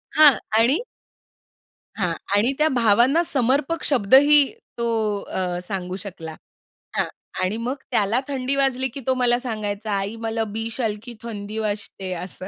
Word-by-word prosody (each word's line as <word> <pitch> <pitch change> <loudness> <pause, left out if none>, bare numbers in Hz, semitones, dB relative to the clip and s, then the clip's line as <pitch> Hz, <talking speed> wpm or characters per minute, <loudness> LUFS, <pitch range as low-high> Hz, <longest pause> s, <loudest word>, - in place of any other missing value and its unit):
हां, 300 -2 +8 0.2
आणि 240 +7 +4 1.2
हां, 180 -5 -1 0.2
आणि 220 +6 +3
त्या 305 - +3
भावांना 245 +6 +4
समर्पक 275 +4 +1
शब्द 255 -4 +4
ही 290 +1 +7 0.3
तो 235 0 -1 0.4
अ, 180 -1 -3
सांगू 185 -1 -4
शकला. 180 -5 -6 0.6
हां, - - +2 0.4
आणि 190 +4 0
मग 240 +4 -2 0.2
त्याला 215 +4 +2
थंडी 270 -1 -1
वाजली 265 -1 +1
की 265 - -8
तो 260 - +4
मला 245 -1 +3
सांगायचा, 215 -3 -4
"आई, 200 +3 -3
मला 225 0 -2
बि 225 +1 -2
शालखी 225 -1 -3
थंडी 215 -2 -6
वाजते." 205 -3 -4
असं. 180 +1 -6
225 Hz, 145 wpm, -23 LUFS, 205-260 Hz, 1.2 s, हां